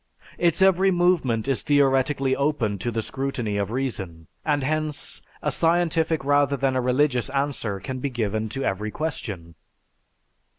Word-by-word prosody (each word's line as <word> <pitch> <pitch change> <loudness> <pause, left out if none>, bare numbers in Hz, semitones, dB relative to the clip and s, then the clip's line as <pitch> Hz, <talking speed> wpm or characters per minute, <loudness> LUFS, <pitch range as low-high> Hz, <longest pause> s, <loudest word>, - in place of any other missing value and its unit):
Its 175 +1 +3
every 190 0 +5
movement 175 - +2
is 135 -2 +2
theoretically 135 -1 +2
open 135 -9 0
to 120 - -2
the 115 -1 -2
scrutiny 125 -6 -3
of 100 -1 -1
reason. 100 -10 -4 0.2
And 145 -3 +1
hence, 155 +1 -2 0.2
a - - +1
scientific 165 -2 +1
rather 145 0 +3
than 135 -1 +1
a 130 - +2
religious 125 0 +1
answer 135 -7 -2
can 130 +7 -5
be 140 - -2
given 110 -3 -2
to 135 +5 -4
every 105 +3 -1
question." 105 - -4
135 Hz, 145 wpm, -24 LUFS, 110-150 Hz, 0.2 s, every